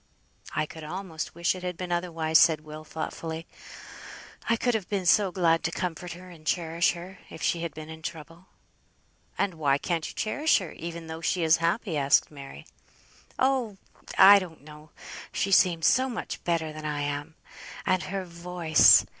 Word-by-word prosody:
"I 155 +1 +1
could 160 +1 -11
almost 165 0 -6
wish 170 0 +1
it 185 - -8
had 180 -1 -4
been 180 0 -5
otherwise," 165 -2 +2
said 160 -3 +4
Will, 155 0 -10
thoughtfully. 160 +1 -6 1.0
"I 230 - +4
could 245 +2 0
have 215 -5 -3
been 200 -3 -2
so 195 +2 +4
glad 165 -3 +2
to 165 - -1
comfort 175 0 -4
her, 180 +1 -12
and 165 -3 -15
cherish 165 +1 +1
her, 180 +2 -10
if - - -9
she 170 - +1
had 170 -1 -5
been 155 0 -8
in 160 0 -10
trouble." 165 +2 -8 0.9
"And 200 -2 0
why 145 -4 +1
can't 165 +1 -2
you - - -11
cherish 290 +9 +2
her, 185 -6 -5
even 170 0 -7
though 160 0 -7
she 175 +1 0
is 160 0 +5
happy?" 170 0 -1
asked 140 +2 +3
Mary. 135 - -11 0.7
"Oh! 255 -6 +1 0.4
I 200 +1 +9
don't 175 -4 -9
know. 150 +1 -14 0.4
She 195 - -1
seems 175 -4 +4
so 260 +1 +4
much 235 - -6
better 160 -3 -1
than 155 0 -9
I 150 -1 -2
am! 145 +2 -4 0.5
And 185 -1 +2
her 190 +3 -4
voice! 170 -2 +4
170 Hz, 180 wpm, -27 LUFS, 160-185 Hz, 1.0 s, I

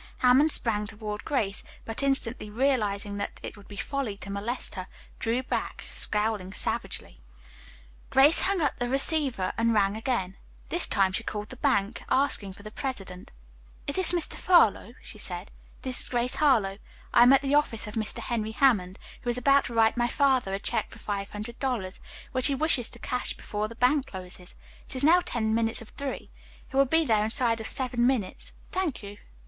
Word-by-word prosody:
Hammond 260 +5 +5
sprang 210 -5 +1
toward 210 0 -6
Grace, 215 -10 -1 0.2
but 225 +3 -1
instantly 260 -5 0
realizing 210 -5 0
that 200 - -5
it - - -6
would 205 -1 -16
be 205 - -10
folly 225 -2 -3
to 200 - -8
molest 210 +6 -3
her, 185 -3 -6 0.3
drew 235 +3 0
back, - - -3
scowling 210 -3 -1
savagely. - - -1 0.9
Grace 285 +5 +5
hung 390 -2 +1
up 290 - +1
the 245 0 -1
receiver 270 - +1
and 230 0 +2
rang 200 -1 +2
again. 220 -5 -2 0.3
This 345 - +6
time 195 -1 +2
she 190 - -2
called 210 -2 -5
the - - -8
bank, 205 -2 0
asking 240 -8 +2
for 205 - -15
the 215 - -8
president. 195 -9 -6 0.6
"Is 285 - -2
this 375 -3 +7
Mr. 350 -2 -1
Furlow?" 245 - +3
she 215 - -9
said. 180 0 -5 0.3
"This 255 -2 -1
is - - -1
Grace 245 0 0
Harlowe. 215 -10 +2 0.3
I - - +6
am 245 +2 +8
at 275 +1 +5
the 275 +1 0
office 290 -7 +2
of 210 - -8
Mr. 220 -2 -2
Henry 220 -3 -3
Hammond, 205 -9 +2 0.2
who 245 - -4
is 240 - 0
about 275 +2 +4
to 235 - -6
write 225 +1 +3
my 240 0 +2
father 255 -6 +1
a - - -4
check 230 - -2
for - - -13
five 200 -2 -4
hundred 215 +3 -8
dollars, 230 -9 -3 0.3
which 255 -1 +2
he 280 - 0
wishes 265 -5 +2
to - - -12
cash 250 -2 -2
before 210 0 -4
the 230 - -11
bank 255 +4 +2
closes. 180 -1 -7 0.3
It - - -7
is 255 - -2
now 340 +4 +6
ten 220 -6 -1
minutes 225 0 +1
of 230 - -10
three. 280 -1 -6 0.4
He - - -8
will 275 0 +5
be 320 +4 +2
there 215 -5 +2
inside 230 0 +1
of 220 - -4
seven 245 -3 +2
minutes. 250 -8 -2 0.2
Thank 355 - -2
you. 205 0 -9
230 Hz, 195 wpm, -27 LUFS, 210-270 Hz, 0.9 s, am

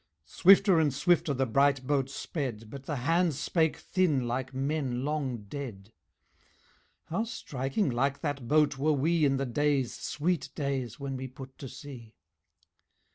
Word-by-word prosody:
Swifter 190 - +5
and 155 -3 +3
swifter 155 +3 +2
the 135 -1 +1
bright 135 +2 +2
boat 135 -1 +1
sped, 125 -7 -5
But 140 -1 -9
the 150 - -2
hands 165 +4 +1
spake 160 +2 +1
thin 155 -10 +1
like 125 +2 -2
men 135 -2 -2
long 135 -7 -2
dead 110 -3 -8 1.2
"How 190 +7 0
striking 140 - -2
like 135 +3 0
that 145 -6 -3
boat 150 -1 +3
were 155 +2 +3
we 155 +3 +2
In 135 -1 +2
the 135 - -1
days, 140 0 +1
sweet 170 +3 -2
days, 135 -5 -3
when 135 -1 -4
we 130 0 -5
put 130 +1 -11
to 135 - -7
sea. 130 -5 -11
140 Hz, 150 wpm, -29 LUFS, 130-155 Hz, 1.2 s, Swifter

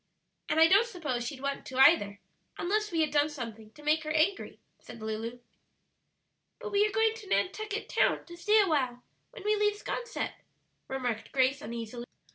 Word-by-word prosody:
"And 315 - +2
I 325 - +9
don't 400 +6 +5
suppose 295 - -3
she'd 275 -3 -6
want 280 0 -3
to 260 - -6
either, 265 -8 +5 0.4
unless 425 +3 0
we 330 -1 +1
had 305 -2 +1
done 295 0 +3
something 230 -7 -7
to 300 - -15
make 310 +1 +2
her 305 - -5
angry," 315 +6 0 0.2
said 235 - -12
Lulu. 220 +2 -4 1.2
"But 440 -3 -6
we 410 +1 +4
are - - -5
going 445 +1 +2
to 430 -3 -11
Nantucket 425 +3 -1
Town - - +1
to 345 - -11
stay 420 +5 +3
a 400 - +2
while 255 -6 0 0.3
when - - -12
we 425 +1 +2
leave 415 0 +2
'Sconset," 475 +3 -4 0.5
remarked 250 -4 -3
Grace 270 +1 +2
uneasily. 235 -1 -6
305 Hz, 180 wpm, -30 LUFS, 250-410 Hz, 1.2 s, I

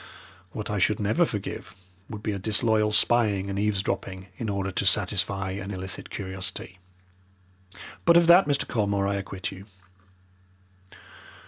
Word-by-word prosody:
What 105 +2 -5
I 105 - -1
should 105 +2 +2
never 110 - +2
forgive 105 -6 -6 0.3
would 105 -1 -8
be 110 - -1
a 100 - -4
disloyal 110 +1 +2
spying 105 -3 +3
and 100 - -3
eavesdropping 95 -2 -2
in 110 - -4
order 100 -1 -2
to 95 - -1
satisfy 95 0 +1
an 95 +1 -6
illicit 95 -1 -4
curiosity. 95 -1 -6 1.2
But 170 0 +6
of 170 - +5
that, 175 +2 +7
Mr. 145 -1 0
Colmore, 100 -3 0
I 100 - 0
acquit 95 -1 -5
you. 95 +1 -11
100 Hz, 140 wpm, -26 LUFS, 95-110 Hz, 1.2 s, that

